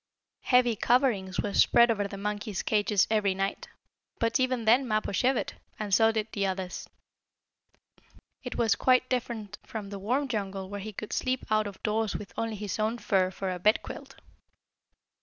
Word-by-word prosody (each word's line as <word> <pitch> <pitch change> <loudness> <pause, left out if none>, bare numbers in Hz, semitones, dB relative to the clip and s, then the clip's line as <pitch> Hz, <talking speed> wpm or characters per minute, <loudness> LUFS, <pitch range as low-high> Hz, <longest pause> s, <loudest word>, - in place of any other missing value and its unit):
Heavy 250 -2 +3
coverings 230 -6 +1
were 205 - -3
spread 235 +3 +5
over 205 -2 -1
the 200 - -8
monkeys' 210 0 -3
cages 210 -2 +2
every 205 -3 +2
night, 195 +1 -3 0.5
but 230 +3 +1
even 255 -3 0
then 245 +4 +4
Mappo 215 -2 0
shivered, 250 +5 +1 0.2
and 210 -2 -4
so 225 +2 +5
did 220 -1 -2
the 200 - -2
others. 190 -1 -3 1.5
It 250 - -6
was 225 -3 +3
quite 255 0 +3
different 235 -5 -3
from 210 -3 -7
the 200 - -6
warm 255 +8 0
jungle 195 -5 -4
where 205 - -4
he 215 +2 -6
could 210 +1 -7
sleep 255 0 -1
out 215 -1 +2
of 200 -1 -10
doors 215 0 0
with 205 - -7
only 225 -1 -2
his 205 0 -4
own 220 +2 0
fur 190 -5 +1
for 190 0 -4
a 180 - -4
bedquilt. 210 +5 -1
215 Hz, 170 wpm, -28 LUFS, 200-235 Hz, 1.5 s, spread